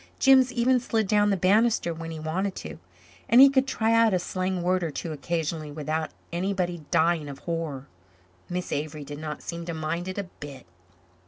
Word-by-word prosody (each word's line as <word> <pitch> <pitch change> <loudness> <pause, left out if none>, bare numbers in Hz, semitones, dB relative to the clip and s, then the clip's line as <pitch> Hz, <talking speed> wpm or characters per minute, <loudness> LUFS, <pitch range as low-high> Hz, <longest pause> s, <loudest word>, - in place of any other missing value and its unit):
Jims 265 -2 +5
even 250 +1 +3
slid 225 -2 0
down 205 0 +3
the 200 - +2
bannisters 195 -1 +2
when 165 0 -7
he 160 - -6
wanted 185 +5 -2
to. 75 0 -8 0.5
And 235 - +6
he 275 +1 +9
could 265 0 +2
try 225 -4 +1
out 230 -3 +4
a - - +3
slang 185 0 -2
word 185 0 +1
or 165 - -1
two 160 +2 -5
occasionally 155 0 -3
without 155 +1 -3 0.2
anybody 180 -2 -2
dying 160 -2 +2
of 140 - -7
horror. 160 -4 -4 0.6
Miss 180 0 -4
Avery 150 +1 -3
did 145 +1 -8
not 155 -1 -6
seem 170 0 -5
to 170 -1 -4
mind 160 +3 -3
it 185 - -5
a 200 - -1
bit. 145 - -11
175 Hz, 190 wpm, -26 LUFS, 155-200 Hz, 0.6 s, he